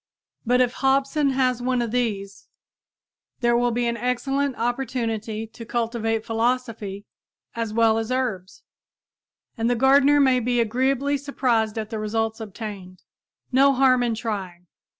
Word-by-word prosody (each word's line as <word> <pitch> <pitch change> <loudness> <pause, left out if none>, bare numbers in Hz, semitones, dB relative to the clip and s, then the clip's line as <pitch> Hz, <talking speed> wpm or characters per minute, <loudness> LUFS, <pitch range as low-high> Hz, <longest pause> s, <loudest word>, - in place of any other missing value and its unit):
But 250 +1 +4
if 245 -1 +1
Hobson 275 +2 +1
has 255 -2 +1
one 250 0 0
of 235 -2 -2
these, 205 -5 -3 0.9
there 240 0 +3
will 245 0 +2
be 240 +1 -1
an 235 0 -1
excellent 270 +3 -1
opportunity 230 -3 -2
to 230 +1 -11
cultivate 225 -1 -2
philosophy 225 -3 -2 0.5
as 230 -2 -3
well 225 0 +3
as 225 +2 -4
herbs. 220 -8 -3 1.0
And 225 +1 +1
the 245 - +2
gardener 275 +3 +5
may 260 -2 +4
be 245 0 0
agreeably 265 +5 +1
surprised 240 -6 0
at 215 0 -4
the 220 - -3
results 220 +1 -2
obtained. 200 -4 -8 0.5
No 275 +2 +5
harm 255 -1 +4
in 235 -2 0
trying! 195 -6 -5
235 Hz, 140 wpm, -23 LUFS, 220-255 Hz, 1.0 s, gardener